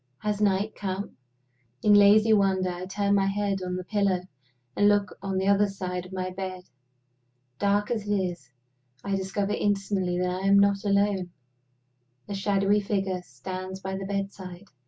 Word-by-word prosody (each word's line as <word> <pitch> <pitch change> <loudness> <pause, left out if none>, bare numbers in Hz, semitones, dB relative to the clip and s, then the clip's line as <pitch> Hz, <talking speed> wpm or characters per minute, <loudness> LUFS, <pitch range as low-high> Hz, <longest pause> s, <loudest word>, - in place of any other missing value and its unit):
Has 210 0 -1
night 205 +1 +1
come? 195 0 -4 0.7
In 210 - +5
lazy 210 +2 +6
wonder, 190 -3 +2
I 180 +1 -6
turn 200 +1 0
my 195 -1 +3
head 200 -1 -1
on 180 0 -3
the 185 - -4
pillow, 195 -2 +1 0.5
and 205 0 +4
look 205 -2 +1
on 195 -1 -2
the 190 - 0
other 200 +1 +4
side 180 -2 -5
of - - -16
my 185 -1 -3
bed. 185 -1 -6 1.0
Dark 205 +1 +1
as 215 -3 -2
it 205 - +2
is, 180 -8 -3 0.5
I 200 -1 -1
discover 195 +1 -2
instantly 195 -3 0
that 180 +1 -1
I 195 - -1
am 200 0 +6
not 200 0 +3
alone. 200 -2 +1 1.0
A 205 - -5
shadowy 200 +1 +2
figure 195 -2 -2
stands 185 +7 -7
by 190 0 -4
my 195 0 -5
bedside. 195 -1 -5
195 Hz, 165 wpm, -27 LUFS, 185-205 Hz, 1.0 s, lazy